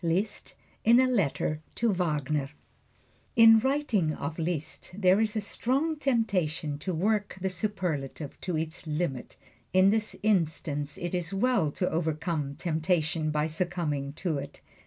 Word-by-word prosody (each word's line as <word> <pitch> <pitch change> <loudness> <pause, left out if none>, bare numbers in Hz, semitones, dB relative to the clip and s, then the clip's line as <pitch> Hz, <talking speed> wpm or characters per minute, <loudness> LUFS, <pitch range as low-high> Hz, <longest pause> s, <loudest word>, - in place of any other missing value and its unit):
Liszt 180 +6 -1 0.3
in 235 +2 +6
a 260 - +5
Letter 160 - 0
to 230 -3 +2
Wagner 150 -5 0
FRANZ - - -19
LISZT - - -36
In 225 -1 +8
writing 240 - +1
of 145 +4 -5
Liszt 160 -2 -3
there 190 +1 +4
is 220 0 0
a 215 - 0
strong 270 +9 0
temptation 185 - 0
to 185 - -3
work 205 +4 0
the 190 0 -1
superlative 170 -7 -3
to 180 -3 -2
its 160 +1 -4
limit. 150 -5 -3 0.4
In 185 +1 +6
this 220 0 0
instance 160 -7 0
it 175 0 -4
is 180 +1 -2
well 235 -6 +2
to 180 - -1
overcome 155 -2 -1
temptation 160 0 0
by 150 0 +1
succumbing 160 -4 -2
to 160 -2 -2
it. 140 +1 -9
175 Hz, 150 wpm, -28 LUFS, 155-210 Hz, 0.4 s, In